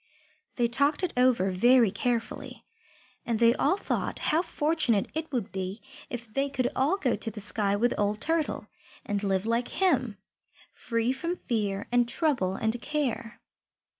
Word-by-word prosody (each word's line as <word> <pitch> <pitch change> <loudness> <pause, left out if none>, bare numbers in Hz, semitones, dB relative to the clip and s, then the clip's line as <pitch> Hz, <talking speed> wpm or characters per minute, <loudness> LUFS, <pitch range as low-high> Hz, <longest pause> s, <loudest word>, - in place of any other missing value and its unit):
They 240 -2 +2
talked 280 +8 +1
it 365 - -1
over 250 -7 +3
very 235 +3 +5
carefully, 230 +2 -3 0.6
and 230 -2 -1
they 230 +1 +5
all 375 - +1
thought - - -2
how 315 +2 +1
fortunate 300 - +1
it 315 -1 -4
would 240 -10 -2
be 190 +2 -4 0.3
if 240 -1 -5
they 275 +1 0
could 255 -3 0
all 290 +9 +2
go 260 - 0
to - - -1
the 215 -1 -8
sky 205 -1 +2
with 240 +4 +2
old 205 +1 0
Turtle, 325 +3 0 0.4
and 205 -1 -1
live 195 0 0
like 235 +2 0
him, 260 - +1 0.6
free 230 +1 -1
from 335 +6 -3
fear 205 - -2
and 240 -1 +3
trouble 250 - 0
and 220 +3 -1
care. 245 -6 -3
240 Hz, 160 wpm, -28 LUFS, 210-280 Hz, 0.6 s, very